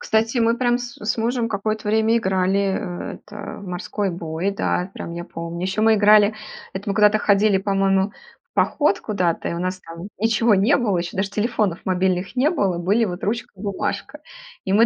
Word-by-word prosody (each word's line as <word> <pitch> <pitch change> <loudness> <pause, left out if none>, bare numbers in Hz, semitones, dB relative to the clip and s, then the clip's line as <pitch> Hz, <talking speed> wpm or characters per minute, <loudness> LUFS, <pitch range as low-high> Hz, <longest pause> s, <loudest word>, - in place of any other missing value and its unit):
Кстати, 225 +3 +1
мы, 230 +1 +2
прям, 245 -1 +2
с 245 -1 -8
с 215 +2 -1
мужем 235 +1 0
какое-то 215 0 -2
время 220 +2 +3
играли, 190 -1 +1
э, 190 -2 -2
это, 210 0 -13 0.2
в 200 - -10
"морской 190 +3 -3
бой", 170 +2 -3
да, 190 -2 -1
прям 170 - -7
я 170 0 -5
помню. 170 0 -6
Еще 190 +3 -1
мы 220 0 +5
играли, 210 0 +6 0.4
это 200 +2 -5
мы 195 - -1
куда-то 210 0 +5
ходили, 200 -1 +3
по-моему, 195 0 +1
в - - -23
поход 295 -1 +2
куда-то, 180 -6 -1
и - - -3
у 170 - -4
нас, 185 +1 -2
там, 170 +3 -9
ничего 225 0 +3
не 210 +9 +4
было, 215 -8 +1
еще 170 0 -4
даже 195 +1 -1
телефонов 210 -4 0
мобильных 185 +2 0
не 270 +5 +3
было, 195 - 0
были, 205 +7 +2
вот, 180 -1 -5
ручка 230 +4 -2
и - - -11
бумажка. 205 +8 -3 0.5
И 190 - 0
мы, 225 +3 +6
200 Hz, 200 wpm, -22 LUFS, 185-220 Hz, 0.5 s, играли